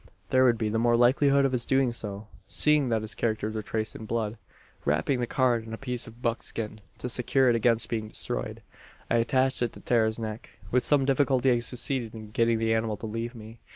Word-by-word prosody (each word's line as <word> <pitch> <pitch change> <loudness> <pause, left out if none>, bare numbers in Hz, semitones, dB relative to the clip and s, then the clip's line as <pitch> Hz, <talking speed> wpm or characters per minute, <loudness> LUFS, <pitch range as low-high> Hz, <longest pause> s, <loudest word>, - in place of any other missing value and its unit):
"There 130 0 +5
would 120 -2 +4
be 110 -1 -1
the 110 +1 0
more 120 0 +3
likelihood 140 +3 +4
of 135 - +1
his 125 -2 -1
doing 135 -2 +2
so, 105 -2 -5 0.2
seeing 150 -3 +3
that 110 -2 0
the - - -5
characters 110 -1 -2
were 110 - -3
traced 110 +1 -3
in 110 - -8
blood. 110 -1 -2 0.4
"Wrapping 80 - +1
the 120 - -1
card 125 -3 +1
in 110 0 -9
a - - -11
piece 125 -2 -4
of 115 +2 -14
buckskin, 115 -2 -3 0.2
to - - -5
secure 125 +2 +2
it 120 - +3
against 115 0 +2
being 110 -2 -3
destroyed, - - -4 0.5
I 115 - +4
attached 130 +3 +2
it 120 - 0
to - - -11
Tara's 110 -2 +1
neck. 110 -1 -7
"With 125 0 +2
some 145 -2 +3
difficulty 135 -1 +2
I 120 - +3
succeeded 120 -1 0
in 110 -1 -9
getting 115 +1 +2
the 115 0 +1
animal 110 -1 -1
to 110 - -7
leave 115 +3 -4
me. 110 0 -11
115 Hz, 220 wpm, -27 LUFS, 110-125 Hz, 0.5 s, There